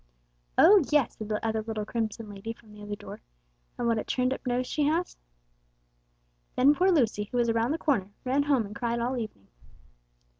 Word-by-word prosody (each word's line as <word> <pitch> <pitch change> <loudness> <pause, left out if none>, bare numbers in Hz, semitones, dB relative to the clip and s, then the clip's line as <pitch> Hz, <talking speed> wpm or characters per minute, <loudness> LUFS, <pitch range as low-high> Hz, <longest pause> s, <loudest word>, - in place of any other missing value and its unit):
'Oh, 395 -2 +7
yes,' 295 -5 +2
said 215 -1 -7
the 210 +1 -2
other 220 -1 0
little 215 -1 -4
crimson 220 -1 -3
lady 205 +2 -6
from 220 -1 -20
the 210 - -13
other 205 0 -5
door, 205 - -10 0.6
'and 240 - -1
what 230 -1 +2
a - - -3
turned 255 0 0
up - - -8
nose 250 +1 0
she 300 - -2
has!' 330 +4 0 1.4
Then 275 +3 +6
poor 365 +6 +3
Lucy, 230 - +2
who 245 - -5
was 240 -1 +2
around 230 +1 +1
the 310 - 0
corner, 260 - 0
ran 265 +3 +2
home 280 -6 +2
and 200 - -9
cried 235 -2 -1
all 245 +3 -1
evening." 215 - -6
235 Hz, 195 wpm, -28 LUFS, 215-265 Hz, 1.4 s, Oh